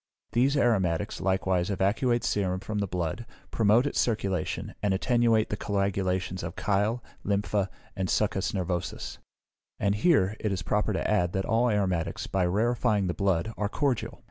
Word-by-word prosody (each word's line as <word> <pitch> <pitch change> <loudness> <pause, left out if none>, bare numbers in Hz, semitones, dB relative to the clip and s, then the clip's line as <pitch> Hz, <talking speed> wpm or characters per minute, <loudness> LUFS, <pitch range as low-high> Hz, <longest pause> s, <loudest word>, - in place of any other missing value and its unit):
These 135 +4 +2
aromatics 100 -6 +1
likewise 95 -1 +1
evacuate 105 +5 +1
serum 95 -2 0
from 105 +2 -4
the 100 - 0
blood, 90 +4 -3 0.3
promote 115 +3 +4
its 145 - -1
circulation, 100 -5 -1
and 100 -2 +1
attenuate 115 0 +2
the - - +1
coagulations 95 -2 -1
of 85 +1 -5
chyle, 105 +4 0 0.2
lympha, 100 -1 0 0.3
and 95 -2 -2
succus 95 +2 +1
nervosus. 90 -2 -3 0.6
And 100 0 +2
here, 105 - +3
it 105 - -1
is 95 - -2
proper 105 +1 0
to 95 - -1
add, 90 -5 +1
that 95 0 -1
all 115 +3 +2
aromatics, 95 -6 0
by 95 -2 0
rarefying 110 +1 +1
the 90 - -1
blood, 100 +2 0
are 105 -1 -1
cordial. 120 -4 -1
100 Hz, 155 wpm, -28 LUFS, 95-110 Hz, 0.6 s, promote